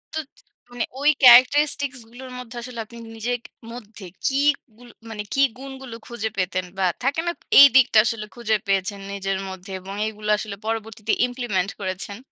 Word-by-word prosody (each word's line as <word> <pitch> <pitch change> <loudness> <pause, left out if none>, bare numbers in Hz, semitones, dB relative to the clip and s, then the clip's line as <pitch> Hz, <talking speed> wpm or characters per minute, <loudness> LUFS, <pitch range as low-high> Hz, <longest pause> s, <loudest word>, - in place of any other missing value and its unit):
তো - - 0 0.5
মানে 245 -1 -2 0.2
ওই 290 - +5
ক্যারাক্টারিস্টিক্স 260 +2 +6
গুলোর 255 +2 -10
মধ্যে 245 -1 -10
আসলে 240 -1 -8
আপনি 235 +2 -14 0.2
নিজের 240 +2 -2
ক - - -41 0.3
মধ্যে 220 -3 -10 0.2
কি 275 +1 +1 0.4
গুল 245 0 -15 0.2
মানে, 210 -2 -5
কি 275 - +2 0.2
গুণগুলো 265 -2 -9
খুঁজে 230 -2 -3
পেতেন 185 -1 -1
বা 190 - +1 0.2
থাকে 280 +5 +1
না? - - +2 0.3
এই 280 - +12
দিকটা 255 -4 +5
আসলে 225 -3 -2
খুঁজে 225 -3 0
পেয়েছেন 195 +1 0
নিজের 195 -1 -2
মধ্যে 190 +1 -9
এবং 195 +1 -8
এগুলো 210 -1 -6
আসলে 210 -1 -5
পরবর্তীতে 225 -1 -3 0.2
ইমপ্লিমেন্ট 240 -7 -2
করেছেন? 195 +1 -4
225 Hz, 165 wpm, -23 LUFS, 200-250 Hz, 0.5 s, এই